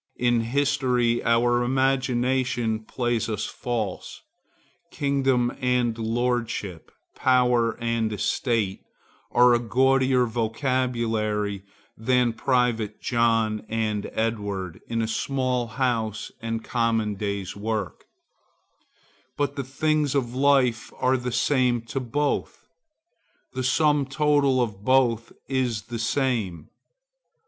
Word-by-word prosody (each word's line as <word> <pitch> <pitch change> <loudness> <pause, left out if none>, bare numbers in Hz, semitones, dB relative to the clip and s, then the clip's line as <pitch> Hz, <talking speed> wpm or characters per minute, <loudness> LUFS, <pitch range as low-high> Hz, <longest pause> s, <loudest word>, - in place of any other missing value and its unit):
In 120 -1 +2
history 125 -1 +1
our 120 +1 +3
imagination 130 -3 +1
plays 120 +1 -2
us 105 -1 -2
false. 115 -6 -4 0.7
Kingdom 135 -3 +1
and 125 -2 +1
lordship, 115 -5 -2 0.2
power 125 -3 +2
and 115 -1 -1
estate, 105 -2 -1 0.5
are 125 0 +5
a 120 - +3
gaudier 130 +1 +3
vocabulary 115 -3 -1 0.3
than 125 +1 +1
private 115 -3 0
John 115 -3 +1
and 110 -2 -1
Edward 100 -6 -3
in 115 -1 -1
a - - -1
small 125 +1 -1
house 115 -3 -2
and 115 0 -3
common 115 -3 0
day's 100 -1 -4
work; 105 -2 -4 1.3
but 145 -1 -1
the 140 - -3
things 150 +2 0
of 120 -4 0
life 130 -4 +2
are 130 +1 +2
the 125 -1 -3
same 125 0 +2
to 115 +4 -4
both; 140 +3 -2 0.9
the 130 - -3
sum 145 +1 +2
total 140 -2 +2
of 105 -4 -6
both 120 -2 +2 0.2
is 125 -5 -1
the 120 -1 -6
same. 110 - -1
120 Hz, 105 wpm, -25 LUFS, 110-130 Hz, 1.3 s, are